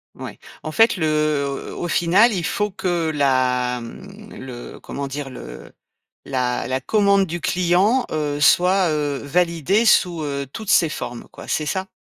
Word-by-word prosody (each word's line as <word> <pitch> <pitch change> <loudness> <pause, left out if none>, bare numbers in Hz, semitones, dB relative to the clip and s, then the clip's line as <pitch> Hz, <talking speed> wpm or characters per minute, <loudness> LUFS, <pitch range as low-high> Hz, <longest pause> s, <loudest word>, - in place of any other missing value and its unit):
Ouais. - - -9 0.2
En 155 - -5
fait, 225 +7 +4
le 170 -5 -1
heu, 150 -2 -1
au 175 - -4
final, 180 +9 +4
il 180 -5 -2
faut 210 +4 -1
que 175 -4 -1
la, 125 -3 +1
mmh, 200 - -11
le 125 -2 -9
comment 140 0 -6
dire? 135 0 -5
Le 130 - -10 0.5
la 125 -2 -2
la 130 +1 -1
commande 200 +3 +3
du 175 +1 -5
client, 185 +10 +2
heu, 145 -2 -2
soit, 180 +5 +4
heu, 145 -2 -1
validée 170 +6 +1
sous, 180 -6 +3
heu, 140 -1 -4
toutes 215 +3 -7
ses 165 - +5
formes, 120 -5 -6
quoi, - - -12
c'est 155 - -1
ça? 190 +4 -2
160 Hz, 165 wpm, -21 LUFS, 140-190 Hz, 0.5 s, ses